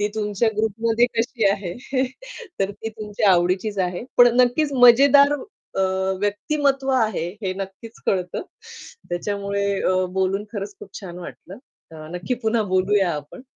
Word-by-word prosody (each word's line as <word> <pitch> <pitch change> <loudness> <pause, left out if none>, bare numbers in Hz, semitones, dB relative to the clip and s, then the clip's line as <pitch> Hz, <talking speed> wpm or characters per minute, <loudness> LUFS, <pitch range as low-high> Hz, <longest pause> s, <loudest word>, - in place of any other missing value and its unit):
ती 205 - +1
तुमच्या 210 +1 0
ग्रुपमध्ये 225 +2 +1
कशी 230 -1 0
आहे? 195 -3 -3 0.9
तर 195 +1 +1
ती 210 +2 -7
तुमच्या 210 -2 0
आवडीचीच 185 +4 +1
आहे. 180 +4 -1
पण 245 0 +8
नक्कीच 280 +4 +1
मजेदार 275 +3 +7 0.5
अ, - - +3 0.4
व्यक्तिमत्व 270 +6 0
आहे, 215 -8 0
हे 185 - -1
नक्कीच 195 +4 -8
कळतं. 180 -2 -1 0.7
त्याच्यामुळे 200 +2 -2
अ, 185 - +2 0.2
बोलून 190 +2 0
खरंच 205 -2 -5
खूप - - -10
छान 180 -3 -8
वाटलं. 180 +1 -10 0.3
अ, 155 -1 -10
नक्की 180 +8 -2
पुन्हा 220 0 +1
बोलूया 190 -1 +2
आपण. 150 - -8
205 Hz, 135 wpm, -22 LUFS, 190-230 Hz, 0.9 s, पण